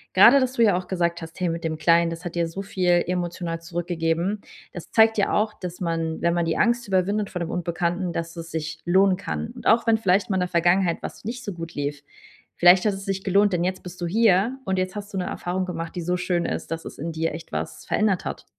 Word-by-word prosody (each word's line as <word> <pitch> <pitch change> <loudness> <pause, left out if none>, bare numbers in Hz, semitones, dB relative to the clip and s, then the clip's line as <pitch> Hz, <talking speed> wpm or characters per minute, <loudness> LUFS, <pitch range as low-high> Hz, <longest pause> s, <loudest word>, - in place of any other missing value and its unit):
grade, 235 +9 +8
dass 255 -1 0
du 235 - +3
ja 205 -5 +4
auch 180 0 -3
gesagt 170 -2 -1
hast: 165 +2 -9
Hey, 180 -2 0
mit 165 0 -4
dem 160 -1 -2
Kleinen, 165 +2 +4
das 165 +2 -7
hat 175 - -4
dir 170 -1 0
so 190 +4 -6
viel 185 -2 -2 0.2
emotional 175 -1 -3
zurückgegeben. 170 +2 -1 0.3
Das 175 - -8
zeigt 220 0 +5
ja 200 - +1
auch, 215 0 +1
dass 180 0 -7
man, 165 -2 -2
wenn 170 0 +2
man 170 -1 +1
die 165 - 0
Angst 240 -1 +2
überwindet 200 +2 +1
vor 180 - -5
dem 170 -1 -3
Unbekannten, 175 +1 -2
dass 165 +1 -4
es 165 0 -7
sich 160 0 -4
lohnen 190 +1 +4
kann. 75 - -4
Und - - -6
auch 230 +2 +4
wenn 225 -1 +4
vielleicht 195 -1 +2
mal 190 - +1
in - - +1
der 180 - 0
Vergangenheit 175 0 +2
was - - -8
nicht 245 +3 -5
so 205 - -4
gut 165 -1 -8
lief, 145 0 -3 0.5
vielleicht 180 +3 +6
hat 210 - +3
es 195 0 -7
sich 195 -1 -2
gelohnt, 200 +2 +4
denn 175 -1 +1
jetzt 185 0 -3
bist 180 0 -9
du 175 - -1
hier 215 +4 +3
und 190 -1 0
jetzt 185 +2 -2
hast 205 0 -7
du - - -3
'ne 180 - -1
Erfahrung 185 +2 -3
gemacht, 170 -1 -5
die - - -2
so 180 +2 0
schön 180 -1 -1
ist, - - -4
dass 165 0 -4
es - - -8
in 165 +3 -4
dir 160 -1 -2
echt 165 - -10
was - - -5
verändert 210 -4 +1
hat. - - -5
180 Hz, 255 wpm, -24 LUFS, 165-195 Hz, 0.5 s, grade